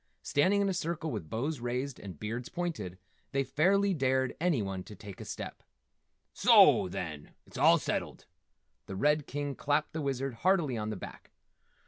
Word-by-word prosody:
Standing 190 +8 +3
in 200 - +2
a 195 - +1
circle 170 -2 -2
with 100 -10 -5
bows 140 +6 -2
raised 125 +3 -3
and 95 -7 -9
beards 115 +3 -4
pointed, 135 - -4 0.4
they 135 0 +2
fairly 195 +9 +2
dared 130 -3 +1
anyone 105 - 0
to 105 - -10
take 100 -1 -10
a - - -7
step. - - -6 0.7
"Soo, - - +6
then, 80 -6 -6
it's - - -17
all - - +7
settled!" - - -3 0.6
The 95 - -5
Red 150 +7 +2
King 145 0 -3
clapped 145 +2 0
the 160 - -3
Wizard 135 -3 -2
heartily 170 -8 +3
on 105 -1 -3
the 110 - -3
back. - - -10
135 Hz, 165 wpm, -31 LUFS, 105-155 Hz, 0.7 s, all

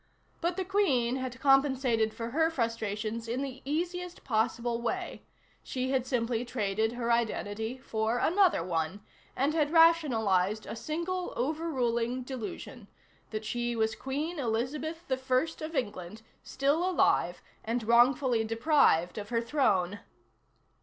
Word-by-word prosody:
But 345 +2 -1
the 380 - -1
Queen 270 -11 +2
had 255 -1 -5
compensated 265 -5 +3
for 230 +1 -6
her 320 +4 +2
frustrations 230 -4 -2
in 245 +4 -2
the 265 -2 -6
easiest 350 +4 -3
possible 235 0 0
way; 235 - -3 0.4
she 260 0 -3
had 260 -2 0
simply 235 -2 0
traded 220 -2 -1
her 240 -1 -1
identity 220 0 -1
for 225 -2 -1
another 355 - +3
one, 170 +2 -2 0.3
and 280 +4 +1
had 305 -3 +2
rationalized 225 - +3
a - - -6
single, 340 +8 -3
overruling 255 -4 -1
delusion: 245 -2 -7 0.4
that 215 0 -5
she 240 +1 -2
was 220 -1 +1
Queen 295 +7 -4
Elizabeth 275 +7 -2
I 260 +5 0
of 320 +1 -7
England, 210 -4 -4 0.2
still 285 +5 0
alive 370 - +2 0.2
and 230 +1 -2
wrongfully 240 +1 +4
deprived 225 - +2
of 205 0 -7
her 230 - +1
throne. 205 -7 +1
245 Hz, 130 wpm, -30 LUFS, 220-290 Hz, 0.4 s, wrongfully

